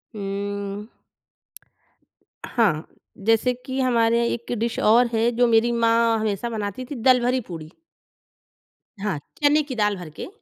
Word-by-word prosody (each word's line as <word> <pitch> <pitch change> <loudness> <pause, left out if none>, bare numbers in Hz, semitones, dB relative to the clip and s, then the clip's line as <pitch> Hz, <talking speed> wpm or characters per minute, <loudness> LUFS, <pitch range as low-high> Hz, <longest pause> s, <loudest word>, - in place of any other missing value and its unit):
हुँ। 200 +1 -4 1.6
हाँ, 200 -10 +1 0.3
जैसे 225 +4 +2
कि 265 0 -3
हमारे 235 -2 +3
यहाँ 235 0 +2
एक 235 0 -5
डिश 230 0 -1
और 235 +3 +5
है 225 +1 +2
जो 245 0 +4
मेरी 235 +1 +3
माँ 230 -1 +3
हमेशा 215 +2 -2
बनाती 215 +2 -4
थी 285 - -7
दलभरी 250 +1 +3
पूड़ी। 160 -2 -8 1.3
हाँ, 195 -6 -2 0.2
चने 295 +1 +4
की 275 -3 -6
दाल 210 -2 +1
भर 175 -3 -8
के - - -5
230 Hz, 140 wpm, -23 LUFS, 205-240 Hz, 1.6 s, और